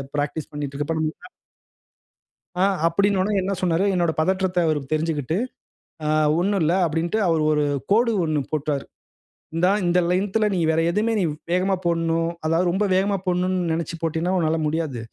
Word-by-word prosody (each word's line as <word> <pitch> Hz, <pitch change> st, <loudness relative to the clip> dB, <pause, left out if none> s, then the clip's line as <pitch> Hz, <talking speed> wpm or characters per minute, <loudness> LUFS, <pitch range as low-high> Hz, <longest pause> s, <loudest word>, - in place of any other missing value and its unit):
Practice 145 Hz, +1 st, -3 dB
பண்ணிட்டு 145 Hz, -1 st, -5 dB
இருக்கப்ப 150 Hz, +3 st, -2 dB
நம்ம 155 Hz, 0 st, 0 dB, 1.5 s
ஆ, -, -, +5 dB, 0.2 s
அப்பிடின்னவுனே 200 Hz, +3 st, +1 dB
என்ன 195 Hz, +2 st, -1 dB
சொன்னாரு? 180 Hz, +1 st, +1 dB
என்னோட 175 Hz, -3 st, +1 dB
பதற்றத்த 185 Hz, +2 st, 0 dB
அவரு 155 Hz, -2 st, +1 dB
தெரிஞ்சிக்கிட்டு, 155 Hz, 0 st, -1 dB, 0.7 s
ஆ -, -, 0 dB, 0.3 s
ஒண்ணுல்ல 185 Hz, -4 st, +1 dB
அப்பிடின்டு, 165 Hz, +5 st, -1 dB
அவரு 165 Hz, -2 st, +2 dB
ஒரு 150 Hz, -1 st, +2 dB, 0.3 s
கோடு 230 Hz, +3 st, +4 dB
ஒண்ணு 155 Hz, -2 st, 0 dB
போட்டாரு. 150 Hz, -2 st, -1 dB, 0.7 s
இந்தா 175 Hz, +3 st, +3 dB, 0.2 s
இந்த 175 Hz, +1 st, +3 dB
லென்த்து 190 Hz, +4 st, +1 dB
ல -, -, +3 dB
நீ 185 Hz, -, 0 dB
வேற 160 Hz, +1 st, +2 dB
எதுவுமே 215 Hz, +5 st, 0 dB
நீ -, -, +1 dB, 0.3 s
வேகமா 185 Hz, +2 st, +2 dB
போட்ணும். 165 Hz, -1 st, +1 dB, 0.2 s
அதாவது 165 Hz, +3 st, +2 dB
ரொம்ப 195 Hz, +4 st, +1 dB
வேகமா 195 Hz, +1 st, +1 dB
போட்ணுன்னு 180 Hz, -1 st, 0 dB
நினச்சு 165 Hz, 0 st, -3 dB
போட்டின்னா, 165 Hz, +3 st, 0 dB
உன்னால 160 Hz, -2 st, +1 dB
முடியாது. 155 Hz, -5 st, -2 dB
170 Hz, 150 wpm, -23 LUFS, 155-185 Hz, 1.5 s, ஆ